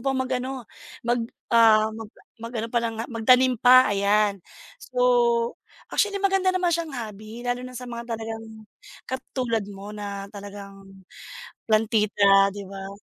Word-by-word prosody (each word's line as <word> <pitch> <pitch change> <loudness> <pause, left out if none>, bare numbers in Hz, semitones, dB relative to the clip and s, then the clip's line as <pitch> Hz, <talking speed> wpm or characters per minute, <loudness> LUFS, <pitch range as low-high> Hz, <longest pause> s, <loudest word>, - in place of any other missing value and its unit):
pang 270 -1 0
mag-ano, 255 0 -3 0.4
mag, 240 +1 +1 0.3
ah, 220 -2 +5
mag 220 0 -8 0.3
mag-ano 230 0 -4
palang 235 -2 0
nga, 225 - -3
magtanim 250 +1 +4
pa, 255 -3 +7
ayan. 200 0 +2 0.4
So, - - -15 1.0
actually, 410 -1 +1
maganda 390 -1 +1
naman 365 -2 +1
siyang 330 -2 -2
hobby, 215 +1 -8
lalo 245 0 -1
na 255 0 -8
sa 250 - -6
mga 235 -1 -7
talagang 225 0 -6 0.6
katulad 250 -4 -3
mo 200 +1 -9
na 200 -1 -6
talagang 195 -1 -11 0.7
plantita, 210 -2 +4
di 200 0 -8
ba? 195 +1 -8
225 Hz, 135 wpm, -24 LUFS, 205-250 Hz, 1.0 s, pa